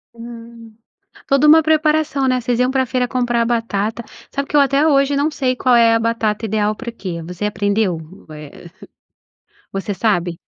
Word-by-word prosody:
Hum. 230 -1 -12 0.5
Toda 275 +2 +3
uma 320 +1 +7
preparação, 305 -2 +1
né? 255 -1 +1
Vocês 240 0 -1
iam 250 +1 +2
pra 265 -1 0
feira 250 0 -1
comprar 240 -2 0
batata. 230 -1 -2 0.3
Sabe 280 0 -4
que 295 - -1
eu - - +6
até 280 +2 +2
hoje 280 -2 +2
não 290 +3 +1
sei 260 -4 -1
qual 250 -1 +2
é 230 -1 +5
a 225 - +3
batata 225 -1 -1
ideal 210 0 0
pra 235 +1 -7
que. 180 -7 -7
Você 180 +4 -7
aprendeu? 205 -2 0
U 160 0 -13
eh, 150 +3 -12 1.0
você 195 +1 -4
sabe? 175 -5 -1
235 Hz, 175 wpm, -18 LUFS, 210-265 Hz, 1.0 s, uma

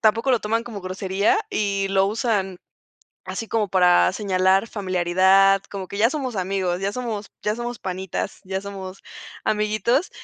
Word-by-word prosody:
tampoco 225 +4 +3
lo 250 - +4
toman 225 +2 0
como 220 -4 -7
grosería 190 - +1
y 200 - 0
lo 195 0 +3
usan 205 -4 -1 0.7
así 225 - -5
como 215 -3 0
para 180 -1 +4
señalar 190 +1 +2
familiaridad, 190 0 +3
como 195 -2 -6
que 200 - -7
ya 225 +3 +4
somos 265 -6 -3
amigos, 185 -1 -1
ya 200 +1 -1
somos 225 -4 -4
ya 210 +1 0
somos 240 -1 -4
panitas, 190 0 -4
ya 190 0 -3
somos 195 -1 -8 0.4
amiguitos, 215 - +1
195 Hz, 150 wpm, -23 LUFS, 190-220 Hz, 0.7 s, lo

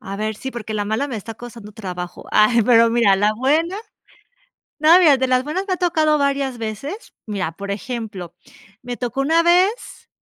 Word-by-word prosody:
A 195 +1 -7
ver, 215 +1 -3
sí, 265 - -6
porque 220 -3 -6
la 205 -1 -1
mala 220 +7 -1
me 245 - -4
está 220 +2 -8
costando 230 -3 -11
trabajo. 180 -5 -7
Ay, 215 +2 +4
pero 230 0 +5
mira, 230 -4 +4
la 205 +2 +2
buena. 315 - +1 1.0
No, 315 +3 +7
mira, 305 -6 +6
de 260 0 0
las 255 0 +2
buenas 365 +7 -3
me 375 - 0
ha - - -2
tocado 315 -4 +2
varias 275 -2 -1
veces. 235 - -6
Mira, 200 -5 -3
por 200 +3 -8
ejemplo, 215 -5 -6 0.5
me 245 -1 -6
tocó 250 +2 -3
una 325 +4 +3
vez, 370 +7 +1
240 Hz, 190 wpm, -20 LUFS, 215-295 Hz, 1.0 s, No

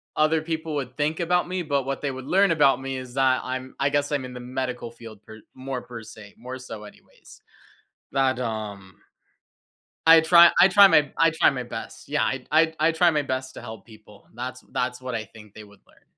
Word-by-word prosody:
other 155 +1 +2
people 160 -1 -4
would 130 -3 -4
think 150 +1 -1
about 180 +1 +1
me, 180 0 -3
but 140 -4 -1
what 135 0 -4
they 140 - -2
would 130 0 -8
learn 195 0 +3
about 145 -5 +3
me 135 0 -4
is 130 -1 -9
that 130 -1 +2
I'm 130 0 -6
I 140 - +2
guess 145 +1 -1
I'm 140 -3 -1
in 125 - -9
the 125 - -8
medical 125 -1 -5
field 115 -3 -13
per 110 +1 -13 0.2
more 130 -1 -5
per 115 -2 -10
se, 105 -2 -13
more 125 +2 -8
so 115 -4 -9
anyways, 105 - -17 0.7
but, 135 -1 +1
um, 105 -5 -5 1.1
I 165 0 +9
try 170 +1 +7
I 185 - +8
try 200 +1 +8
my 150 -6 +3
I 165 - +5
try 160 +2 +4
my 130 -2 -4
best. 120 - -9
Yeah. - - +1
I 135 -1 -2
I 160 +1 +3
I 155 +2 +3
try 175 +2 +4
my 150 -2 +1
best 130 -1 -4
to - - -9
help 110 -4 -10
people. 105 -2 -18
That's 125 +1 -6
that's 125 0 -2
what 130 -1 -5
I 110 - -3
think 105 0 -16
they 110 - -11
would 100 -1 -20
learn. - - -26
130 Hz, 220 wpm, -24 LUFS, 120-155 Hz, 1.1 s, I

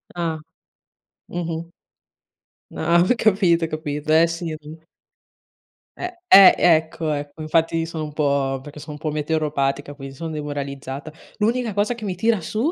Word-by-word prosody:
Ah. 165 -2 -2 0.9
Mh-mh. 170 -1 -4 1.0
Ah, 170 +2 +2
ho 250 - +3
capito, 185 -6 +3
ho - - -4
capito. 150 -1 -3
Eh, 165 +1 +6
sì. 165 -1 -4 1.4
Eh, 360 - -4 0.2
eh 195 - +9
ecco, 160 -1 +2
ecco, 145 +1 -5
infatti 165 +1 +1
sono 160 -2 -4
un 150 - -9
po' 140 -3 0
perché 145 +1 -10
sono 150 +1 -8
un - - -8
po' 155 0 -3
meteoropatica, 145 -2 -1
quindi 135 -1 -9
son 160 +3 -5
demoralizzata. 140 -1 -5 0.3
L'unica 230 +2 0
cosa 210 +3 +1
che 230 -2 -10
mi 190 -3 -2
tira 220 +2 +1
su 225 - -1
160 Hz, 145 wpm, -22 LUFS, 145-175 Hz, 1.4 s, eh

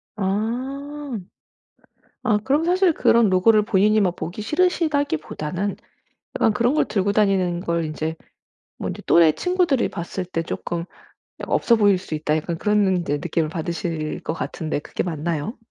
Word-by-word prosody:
아. 255 +7 -3 1.0
아 210 -3 +3
그럼 290 +6 +1
사실 360 -1 +3
그런 235 -7 +4
로고를 210 +4 +4
본인이 210 +1 +3
막 180 -3 +1
보기 175 +6 -5
싫으시다기보다는 285 - 0 0.6
약간 225 - +3
그런 235 +5 +2
걸 - - +3
들고 200 -1 0
다니는 190 -4 +2
걸 170 -2 -1
인제 155 +1 -3 0.6
뭐 - - -4
인제 - - -6
또래 165 -2 +6
친구들이 360 - +1
봤을 180 +2 -5
때 165 -2 -3
'쪼끔 170 +1 -4 0.6
없어 235 - +3
보일 205 -3 +4
수 180 - -7
있다.' 155 0 0
약간 165 +2 -3
그런 210 +1 +2
인제 175 -6 0
느낌을 165 -1 -1
받으실 165 -1 -3
것 - - -3
같은데 160 -1 -3
그게 150 - -4
맞나요? 165 - -3
195 Hz, 305 characters per minute, -22 LUFS, 170-235 Hz, 1.0 s, 또래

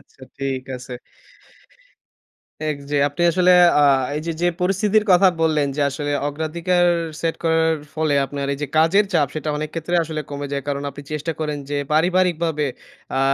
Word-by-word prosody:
আচ্ছা - - -24 0.2
ঠিক 135 -1 -2
আছে। 125 0 -10 1.8
এক 150 -2 -1
যে 145 - +1
আপনি 145 +4 -6
আসলে 180 +1 +4 0.3
আ - - +5 0.4
এইযে 160 +2 -3
যে - - +2 0.2
পরিস্থিতির 200 +3 +2
কথা 190 +2 +6
বললেন, 155 -3 +2
যে - - +1
আসলে 145 +1 -4 0.2
অগ্রাধিকার 170 +4 0 0.4
সেট 165 -1 -1
করার 160 0 +2 0.2
ফলে 155 -2 0
আপনার 140 +1 -4
এই - - -6
যে 150 - -2
কাজের 185 +6 +4
চাপ 150 -5 +3
সেটা 155 0 -3
অনেক 155 0 -4
ক্ষেত্রে 165 +2 -2
আসলে 155 -1 -4
কমে 145 0 -4
যায়। 140 -2 -2
কারণ 140 0 -2
আপনি 140 +1 -10
চেষ্টা 150 +2 -2
করেন 150 -2 -2
যে 145 - -1 0.2
পারিবারিকভাবে 170 -2 +1 0.5
আ - - +1
155 Hz, 165 wpm, -21 LUFS, 145-170 Hz, 1.8 s, কথা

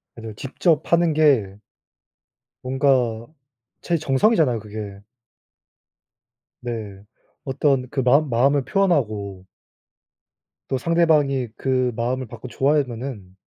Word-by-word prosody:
그래도 115 -2 -8
직접 150 - -1
하는 170 -1 +4
게 135 -11 +2 1.1
뭔가 125 -4 +1 0.5
제 170 - 0
정성이잖아요, 145 - +2
그게. 105 -2 -8 1.6
네. 110 -5 -6 0.4
어떤 135 -1 0
그 135 - -2
마음 140 +3 +3
마음을 135 +4 +2
표현하고 110 - -1 1.2
또 135 - -1
상대방이 150 -5 +2
그 130 -2 0
마음을 125 +2 -2
받고 125 - -10
좋아하면은 125 -8 -2
130 Hz, 215 characters per minute, -22 LUFS, 115-145 Hz, 1.6 s, 하는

